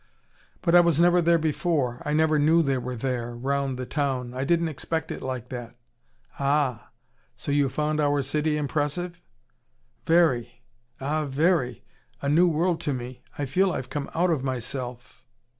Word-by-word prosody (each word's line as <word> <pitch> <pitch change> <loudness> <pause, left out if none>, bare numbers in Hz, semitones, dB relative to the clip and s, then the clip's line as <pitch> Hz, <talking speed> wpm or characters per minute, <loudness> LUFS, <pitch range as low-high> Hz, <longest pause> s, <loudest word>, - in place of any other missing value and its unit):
"But 170 - +2
I 175 - +9
was 170 -3 +3
never 175 +1 +5
there 170 0 +4
before. 155 -5 0
I 150 - -2
never 155 0 +3
knew 160 +3 +4
they 135 -3 0
were 125 0 -4
there, 120 -1 -3
round 135 +1 -1
the 130 - -4
town. 130 -4 -2
I 130 +1 -2
didn't 170 +2 +2
expect 160 +2 -3
it - - -5
like 130 -2 -5
that." 120 -2 -7 0.6
"Ah! 140 -4 0 0.5
So 145 - -4
you 140 -1 +3
found 150 +3 -1
our 145 -1 +2
city 150 +2 0
impressive?" 155 +4 -2 0.9
"Very! 135 -8 +2 0.4
Ah, 150 +3 -1
very! 140 -3 +1 0.4
A 140 - -2
new 170 +5 +5
world 170 +1 +1
to 145 -4 -1
me. 125 0 -7 0.2
I 145 - -1
feel 185 +8 +2
I've 130 -5 -5
come 145 -2 -3
out 175 +2 +2
of 145 -5 0
myself." 125 -1 -5
145 Hz, 165 wpm, -26 LUFS, 130-160 Hz, 0.9 s, I